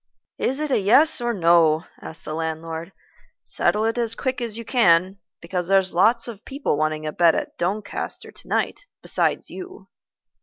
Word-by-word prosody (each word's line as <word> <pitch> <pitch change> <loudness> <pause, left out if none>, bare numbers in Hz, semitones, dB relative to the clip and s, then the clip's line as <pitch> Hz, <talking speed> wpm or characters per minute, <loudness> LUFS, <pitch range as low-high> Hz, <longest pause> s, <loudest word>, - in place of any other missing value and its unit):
"Is 265 +3 0
it 305 -2 -2
yes 260 +9 +4
or 240 0 0
no?" 170 -4 +3 0.2
asked 160 - -9
the 155 - -5
landlord. 160 +2 -4 0.5
"Settle 215 +1 0
it 225 +2 0
as 230 -1 0
quick 260 -2 -2
as 230 -2 -2
you 230 - -7
can, 190 -5 +3 0.2
because 175 0 -3
there's 190 -1 +3
lots 230 +7 +3
of 225 -3 -9
people 275 - -2
wanting 155 +1 -1
a 155 - -2
bed 170 0 +4
at - - -4
Doncaster 200 +4 -3
to - - -9
night - - -2 0.2
besides - - 0
you." 375 +1 -10
195 Hz, 165 wpm, -23 LUFS, 165-240 Hz, 0.5 s, yes